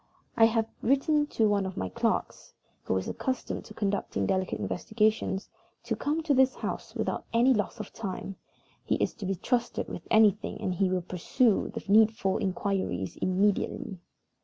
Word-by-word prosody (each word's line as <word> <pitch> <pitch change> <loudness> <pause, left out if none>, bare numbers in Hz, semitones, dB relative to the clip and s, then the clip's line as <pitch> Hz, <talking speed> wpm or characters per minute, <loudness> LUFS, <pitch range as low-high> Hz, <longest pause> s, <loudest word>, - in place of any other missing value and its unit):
I 225 - +7
have 225 -1 +2
written 295 +4 +2
to 225 -6 +2
one 205 -1 +2
of 190 - -7
my 95 - -1
clerks, - - -2 0.3
who - - +1
is 95 - -3
accustomed 260 -2 -3
to 215 - -12
conducting 195 - -1
delicate 185 - -1
investigations, 215 -3 0 0.4
to - - -2
come 310 +3 -1
to 305 -3 +2
this 265 0 +4
house - - -5
without - - -2
loss 235 -2 +3
of 215 - -7
time. 195 -2 -5 0.5
He - - +1
is - - 0
to 205 -5 -6
be 195 - 0
trusted 240 +7 -1
with - - -8
anything, 215 -2 +3
and 185 - -1
he 185 +1 +1
will 185 -1 0
pursue 190 +6 +1
the - - -6
needful 215 -1 +4
inquiries 190 - -2
immediately. 190 0 0
210 Hz, 160 wpm, -28 LUFS, 190-230 Hz, 0.5 s, I